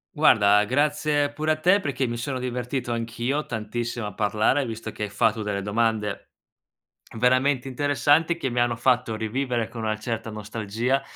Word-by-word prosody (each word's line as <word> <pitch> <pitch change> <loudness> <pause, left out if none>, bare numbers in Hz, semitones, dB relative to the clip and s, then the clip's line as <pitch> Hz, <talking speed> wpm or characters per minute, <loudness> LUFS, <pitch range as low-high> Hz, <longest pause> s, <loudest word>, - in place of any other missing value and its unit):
Guarda, 105 0 +5
grazie 145 +2 +1
pure 155 +2 -1
a - - +3
te 185 +6 +4
perché 135 -6 -2
mi 120 0 -3
sono 130 +2 -3
divertito 125 0 -3
anch'io 120 +5 -2
tantissimo 115 0 -4
a 105 - -7
parlare, 110 +7 +1
visto 115 -1 -6
che 105 - -6
hai 105 - -2
fatto 110 +1 +1
delle 100 -1 -2
domande 105 0 -1 0.9
veramente 130 +2 +2
interessanti 145 +5 +2
che 135 - -2
mi 120 0 -1
hanno 120 -1 +2
fatto 120 -1 +1
rivivere 120 +1 -2
con 115 -1 -7
una 110 0 -1
certa 110 0 -4
nostalgia 110 +4 -2
120 Hz, 160 wpm, -25 LUFS, 110-135 Hz, 0.9 s, Guarda